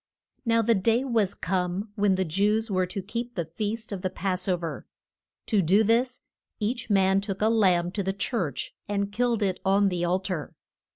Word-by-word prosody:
NOW 230 Hz, -1 st, +3 dB
the 230 Hz, +1 st, +4 dB
day 225 Hz, +5 st, +2 dB
was 225 Hz, -7 st, +1 dB
come 185 Hz, +3 st, -2 dB
when 205 Hz, -2 st, +2 dB
the 190 Hz, 0 st, 0 dB
Jews 210 Hz, +6 st, +1 dB
were 185 Hz, -1 st, +1 dB
to 190 Hz, +2 st, -5 dB
keep 235 Hz, +4 st, -5 dB
the 170 Hz, -, -1 dB
feast 215 Hz, +7 st, -4 dB
of 195 Hz, -3 st, -4 dB
the 185 Hz, -, -1 dB
pass 185 Hz, 0 st, -2 dB
o 185 Hz, -2 st, +2 dB
ver. 170 Hz, -1 st, -6 dB, 0.6 s
To 210 Hz, -4 st, +2 dB
do 190 Hz, +6 st, +4 dB
this 240 Hz, +4 st, +1 dB, 0.4 s
each 235 Hz, +4 st, -2 dB
man 195 Hz, -1 st, +3 dB
took 195 Hz, -1 st, -4 dB
a 215 Hz, -, +3 dB
lamb 185 Hz, -6 st, +3 dB
to 200 Hz, -, -2 dB
the 195 Hz, 0 st, -1 dB
church, 195 Hz, -, -2 dB, 0.2 s
and 200 Hz, -1 st, -1 dB
killed 235 Hz, 0 st, +1 dB
it 190 Hz, -2 st, 0 dB
on 195 Hz, +1 st, +3 dB
the 175 Hz, -2 st, -2 dB
al 175 Hz, +2 st, +2 dB
tar. 180 Hz, -6 st, -4 dB
200 Hz, 195 wpm, -27 LUFS, 185-220 Hz, 0.6 s, the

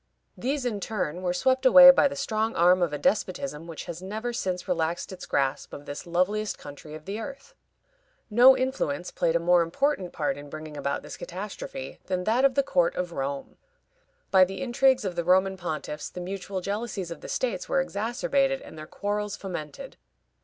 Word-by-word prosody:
These, 265 Hz, +6 st, -2 dB
in 220 Hz, -4 st, -1 dB
turn, 185 Hz, -5 st, -3 dB
were 180 Hz, -1 st, 0 dB
swept 260 Hz, +9 st, +1 dB
away 270 Hz, +1 st, +10 dB
by 270 Hz, -, +4 dB
the 280 Hz, -, -5 dB
strong 225 Hz, -5 st, -1 dB
arm 180 Hz, +1 st, +5 dB
of 170 Hz, -3 st, +1 dB
a 150 Hz, -, -2 dB
despotism 150 Hz, -3 st, -1 dB
which 165 Hz, -2 st, -7 dB
has 170 Hz, -1 st, -7 dB
never 220 Hz, +5 st, -4 dB
since 185 Hz, -5 st, -3 dB
relaxed 170 Hz, -1 st, -1 dB
its 185 Hz, -, -9 dB
grasp 135 Hz, +1 st, -1 dB
of 145 Hz, -, -8 dB
this 145 Hz, +4 st, -7 dB
loveliest 200 Hz, +5 st, 0 dB
country 145 Hz, +1 st, -10 dB
of 155 Hz, -, -11 dB
the 200 Hz, +3 st, -4 dB
earth. 275 Hz, -, -8 dB, 0.7 s
No 245 Hz, +4 st, +7 dB
influence 215 Hz, -, -2 dB
played 165 Hz, -1 st, 0 dB
a -, -, +4 dB
more 175 Hz, +1 st, +4 dB
important 185 Hz, -, 0 dB
part 185 Hz, -, -1 dB
in 145 Hz, 0 st, -10 dB
bringing 155 Hz, 0 st, -8 dB
about 140 Hz, -1 st, -2 dB
this -, -, -8 dB
catastrophe 185 Hz, -8 st, -7 dB
than 180 Hz, -1 st, -1 dB
that 230 Hz, +6 st, +2 dB
of 270 Hz, -2 st, +3 dB
the 275 Hz, -, +3 dB
court 175 Hz, -9 st, +1 dB
of 180 Hz, -1 st, -3 dB
Rome. 140 Hz, -2 st, -4 dB, 0.7 s
By 190 Hz, -1 st, +7 dB
the 190 Hz, +7 st, -2 dB
intrigues 260 Hz, -1 st, +3 dB
of 185 Hz, -2 st, -3 dB
the 170 Hz, -, -1 dB
Roman 190 Hz, +2 st, +3 dB
pontiffs 155 Hz, -4 st, -5 dB
the -, -, -7 dB
mutual 190 Hz, +1 st, -5 dB
jealousies 200 Hz, -2 st, -4 dB
of 170 Hz, -, -7 dB
the -, -, -8 dB
states -, -, -2 dB
were -, -, +2 dB
exacerbated 270 Hz, -, 0 dB
and 160 Hz, -, -11 dB
their 155 Hz, -, -8 dB
quarrels 205 Hz, 0 st, -3 dB
fomented. 155 Hz, -7 st, -7 dB
185 Hz, 190 wpm, -27 LUFS, 170-240 Hz, 0.7 s, away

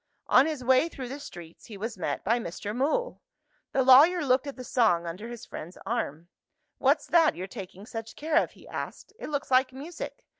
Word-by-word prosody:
On 260 Hz, +4 st, +5 dB
his 300 Hz, -5 st, -3 dB
way 260 Hz, +6 st, +4 dB
through 260 Hz, -6 st, -7 dB
the 275 Hz, +3 st, -6 dB
streets, 170 Hz, -, -11 dB
he 215 Hz, -, -9 dB
was 225 Hz, +3 st, -4 dB
met 180 Hz, -, -3 dB
by 230 Hz, +4 st, +2 dB
Mr. 205 Hz, +2 st, -5 dB
Mool. 315 Hz, -, 0 dB, 0.5 s
The 265 Hz, -, +2 dB
lawyer 295 Hz, +6 st, +7 dB
looked 260 Hz, +2 st, +2 dB
at 280 Hz, -, -5 dB
the 255 Hz, -, -8 dB
song 220 Hz, -9 st, +2 dB
under 180 Hz, +7 st, -6 dB
his 240 Hz, -1 st, -8 dB
friend's 170 Hz, +4 st, -9 dB
arm. 180 Hz, -8 st, -3 dB, 0.5 s
"What's -, -, +3 dB
that 330 Hz, -2 st, +4 dB
you're 180 Hz, -, -5 dB
taking 195 Hz, -1 st, -9 dB
such 225 Hz, -1 st, -7 dB
care 315 Hz, +1 st, 0 dB
of?" -, -, -8 dB
he -, -, -17 dB
asked. -, -, -7 dB
"It -, -, -6 dB
looks 285 Hz, -2 st, -3 dB
like 255 Hz, 0 st, +4 dB
music. 300 Hz, +6 st, -8 dB
250 Hz, 200 wpm, -28 LUFS, 205-280 Hz, 0.5 s, lawyer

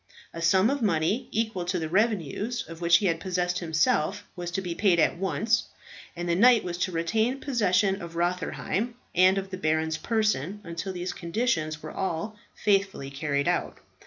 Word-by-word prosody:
A 165 Hz, -, -6 dB
sum 190 Hz, +7 st, +4 dB
of 280 Hz, -1 st, -2 dB
money, 195 Hz, +3 st, +1 dB
equal 220 Hz, -4 st, -1 dB
to 180 Hz, +1 st, -1 dB
the 160 Hz, -2 st, -2 dB
revenues 210 Hz, -, 0 dB
of 165 Hz, 0 st, -10 dB
which 170 Hz, -1 st, +6 dB
he 205 Hz, -, -2 dB
had 165 Hz, -3 st, +1 dB
possessed 180 Hz, -1 st, -1 dB
himself, 160 Hz, +3 st, +1 dB
was 175 Hz, -1 st, -4 dB
to 175 Hz, -, -2 dB
be 180 Hz, -3 st, -4 dB
paid 180 Hz, -2 st, +3 dB
at -, -, +3 dB
once, 220 Hz, +4 st, +1 dB, 0.5 s
and 175 Hz, 0 st, -4 dB
the 170 Hz, -, +2 dB
knight 235 Hz, +5 st, +6 dB
was 175 Hz, -1 st, -4 dB
to 185 Hz, -, 0 dB
retain 220 Hz, +10 st, 0 dB
possession 205 Hz, -7 st, +1 dB
of 170 Hz, -1 st, -8 dB
Rotherheim 180 Hz, +6 st, -1 dB, 0.2 s
and 185 Hz, +2 st, +5 dB
of 195 Hz, 0 st, -4 dB
the 185 Hz, -, -4 dB
baron's 160 Hz, -1 st, 0 dB
person 210 Hz, -, 0 dB
until 170 Hz, +2 st, -5 dB
these 180 Hz, 0 st, -4 dB
conditions 170 Hz, -5 st, -1 dB
were -, -, -6 dB
all 190 Hz, +4 st, -3 dB, 0.2 s
faithfully 195 Hz, -9 st, 0 dB
carried 140 Hz, 0 st, -1 dB
out. -, -, 0 dB
180 Hz, 180 wpm, -27 LUFS, 165-210 Hz, 0.5 s, which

